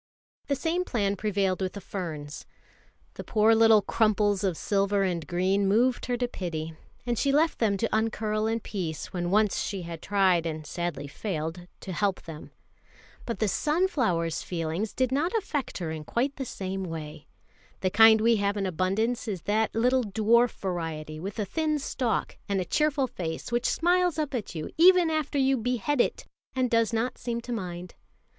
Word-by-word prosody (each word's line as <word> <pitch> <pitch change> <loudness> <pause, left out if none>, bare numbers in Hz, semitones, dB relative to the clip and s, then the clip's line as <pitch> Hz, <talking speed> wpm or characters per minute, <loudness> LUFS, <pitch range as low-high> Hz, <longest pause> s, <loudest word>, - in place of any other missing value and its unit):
The 280 - +1
same 335 +5 0
plan 200 - 0
prevailed 195 -2 0
with 185 -1 -2
the 200 - -6
ferns. 160 -7 -6 0.7
The - - -7
poor 220 0 +3
little 225 -2 +6
crumples 210 -2 +2
of 185 -5 0
silver 200 0 +1
and 175 -4 -2
green 190 +3 +1
moved 240 +6 +2
her 245 -1 0
to 245 0 0
pity, 165 -7 -5 0.3
and 240 -2 -1
she 280 - +2
left 310 +3 +2
them 210 -4 +2
to 220 +2 -1
uncurl 220 -1 0
in 225 +1 -1
peace 170 -8 -5
when 175 -1 -2
once 210 +1 +2
she 195 -3 -3
had 165 -1 -7
tried 185 -4 +2
and 155 -1 -5
sadly 170 -2 -4
failed 165 +1 -4
to 190 - -6
help 200 +1 0
them. 160 -1 -9 0.8
But 235 - -2
the 215 - +1
sunflowers' 255 - 0
feelings 170 +4 -3
did 255 -1 +1
not 300 +7 0
affect 310 - -2
her 170 -4 -3
in 155 -1 -5
quite 255 - -1
the 270 - -3
same 190 -4 -4
way. 160 -3 -7 0.5
The 185 - +1
kind 220 +1 +7
we 230 0 +4
have 200 0 0
in 195 - -1
abundance 195 +8 0
is 190 -6 -4
that 215 +2 0
little 250 +3 +3
dwarf 225 +3 +3
variety 160 -4 -4
with 195 +5 -6
a 210 - -1
thin 310 - 0
stalk, 255 -4 -2
and 200 -1 +1
a 185 - -1
cheerful 300 - +1
face 170 -4 -5
which 240 +1 +1
smiles 355 -1 +2
up 300 -3 -2
at 225 -7 -4
you 155 -1 -5
even 355 -1 +6
after 310 -2 -1
you 270 0 +3
behead 245 +3 0
it, - - -2 0.3
and 255 -2 +1
does 230 -1 +3
not 230 +2 -1
seem 235 -1 -3
to 240 +1 -5
mind. 180 -4 -5
210 Hz, 180 wpm, -27 LUFS, 180-245 Hz, 0.8 s, kind